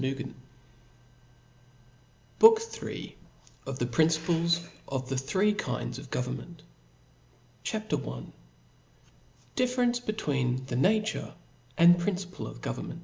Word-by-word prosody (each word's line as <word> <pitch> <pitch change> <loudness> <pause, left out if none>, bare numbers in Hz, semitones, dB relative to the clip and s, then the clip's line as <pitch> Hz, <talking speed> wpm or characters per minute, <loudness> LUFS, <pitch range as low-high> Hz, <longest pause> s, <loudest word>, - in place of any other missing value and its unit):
vj 135 0 -3 2.1
BOOK 450 0 +9
IIL 455 0 -6 0.6
Of 135 -1 -3
the 120 - 0
Principles 165 +5 +2 0.2
of 130 -1 -3
the 135 - -1
three 185 +11 +2
kinds 205 - -3
of 140 -1 -11
Government. 135 +7 -4 1.0
CHAP. - - -3
L 60 0 -4 1.2
difference 245 -1 +2
between 135 - -1
the 130 - -4
Nature 215 - +1 0.4
and 175 +1 +7
Principle 185 0 -3
of - - -9
Government. - - -5
165 Hz, 100 wpm, -29 LUFS, 130-205 Hz, 2.1 s, BOOK